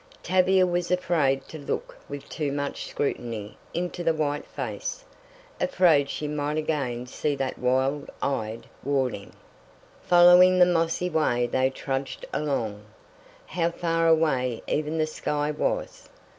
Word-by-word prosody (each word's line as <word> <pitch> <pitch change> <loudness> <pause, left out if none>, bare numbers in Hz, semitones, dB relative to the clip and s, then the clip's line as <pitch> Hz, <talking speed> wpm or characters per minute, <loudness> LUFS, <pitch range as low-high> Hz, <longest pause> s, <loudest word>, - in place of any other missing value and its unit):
Tavia 185 0 +4
was 175 -1 -1
afraid 150 -7 +1
to 160 - -8
look 140 - -4
with 145 0 -7
too 150 -3 -3
much 145 0 -3
scrutiny 115 -6 -3 0.2
into 175 0 -3
the 165 -1 +2
white 145 -1 -1
face, - - -5 0.6
afraid 165 - +3
she 150 - -3
might 150 0 -2
again 135 -6 -2
see 145 +3 -2
that 135 -1 -3
wild 130 +3 0
eyed 115 -5 -2 0.2
warning. 130 -7 -1 0.7
Following 180 +1 +7
the 180 - +7
mossy 165 0 +1
way 155 -8 +1
they 130 +2 +1
trudged 135 0 -4
along. 115 -9 -2 0.6
How 170 -2 0
far 165 -1 0
away 135 -7 +2
even 155 +2 -1
the 155 - +2
sky 150 -1 -2
was! 150 - -3
150 Hz, 130 wpm, -26 LUFS, 135-170 Hz, 0.7 s, Following